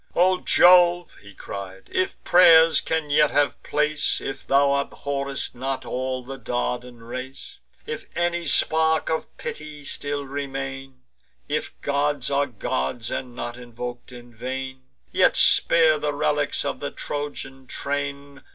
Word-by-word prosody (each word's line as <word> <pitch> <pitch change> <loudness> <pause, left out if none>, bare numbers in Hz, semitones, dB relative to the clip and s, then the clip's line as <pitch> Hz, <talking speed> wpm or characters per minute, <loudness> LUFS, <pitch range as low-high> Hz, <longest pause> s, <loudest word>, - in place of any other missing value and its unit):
"O 185 +1 +4
Jove," 175 -1 +5
he 100 -1 -14
cried, 95 -1 -8
"if 185 - 0
pray'rs 165 -2 +7
can 160 -2 -2
yet 150 0 +5
have 145 -3 +1
place; 150 0 0
If 135 0 -6
thou 140 0 +4
abhorr'st 140 -1 -4
not 130 +1 -4
all 130 +1 -3
the 135 +2 -8
Dardan 125 0 -3
race; 130 +3 -8 0.3
If - - -6
any 175 0 0
spark 160 +2 +2
of 160 - -4
pity 150 -1 -7
still 145 0 -2
remain; 135 -1 -6 0.4
If - - -3
gods 145 -1 0
are 140 0 +2
gods, 110 - -3
and 125 -2 -4
not 120 -1 -5
invok'd 120 0 -8
in 120 -1 -12
vain; 130 +2 -6 0.3
Yet - - +4
spare 160 -2 +5
the 150 0 -1
relics 145 0 0
of - - -3
the 145 - -3
Trojan 135 -2 -6
train! 140 0 -4
140 Hz, 135 wpm, -24 LUFS, 125-150 Hz, 0.4 s, pray'rs